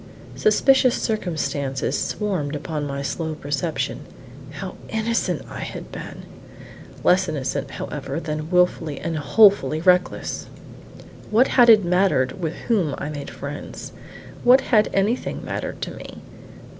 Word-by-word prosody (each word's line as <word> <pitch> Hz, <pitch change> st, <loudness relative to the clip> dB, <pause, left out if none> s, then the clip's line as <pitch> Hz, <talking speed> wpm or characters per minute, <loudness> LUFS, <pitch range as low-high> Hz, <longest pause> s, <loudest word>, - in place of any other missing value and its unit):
Suspicious 255 Hz, +3 st, +4 dB
circumstances 155 Hz, -, -2 dB
swarmed 180 Hz, -9 st, -2 dB
upon 150 Hz, 0 st, -4 dB
my 140 Hz, 0 st, -4 dB
slow 160 Hz, +2 st, -3 dB
perception: 150 Hz, +2 st, -2 dB, 0.5 s
how 180 Hz, +6 st, -7 dB, 0.2 s
innocent 225 Hz, +1 st, -1 dB
I -, -, -8 dB
had -, -, -7 dB
been! -, -, -8 dB, 0.8 s
Less 185 Hz, 0 st, +4 dB
innocent, 140 Hz, -1 st, -3 dB
however, 140 Hz, +1 st, -5 dB
than 155 Hz, -1 st, -4 dB
wilfully 180 Hz, -5 st, +1 dB
and 165 Hz, -1 st, -3 dB
wholly 155 Hz, -3 st, +4 dB
reckless: 180 Hz, +1 st, +1 dB, 0.8 s
what 230 Hz, +5 st, +4 dB
had 245 Hz, -2 st, +6 dB
it 215 Hz, -4 st, +7 dB
mattered 175 Hz, -6 st, +1 dB
with 160 Hz, -1 st, -2 dB
whom 185 Hz, -, +1 dB
I 145 Hz, -, -4 dB
made 145 Hz, -2 st, -6 dB
friends? 145 Hz, +1 st, -7 dB, 0.5 s
What 255 Hz, +2 st, +7 dB
had 220 Hz, -5 st, +3 dB
anything 205 Hz, +6 st, -1 dB
mattered -, -, -4 dB
to -, -, -4 dB
me? -, -, -10 dB
165 Hz, 125 wpm, -22 LUFS, 145-210 Hz, 0.8 s, it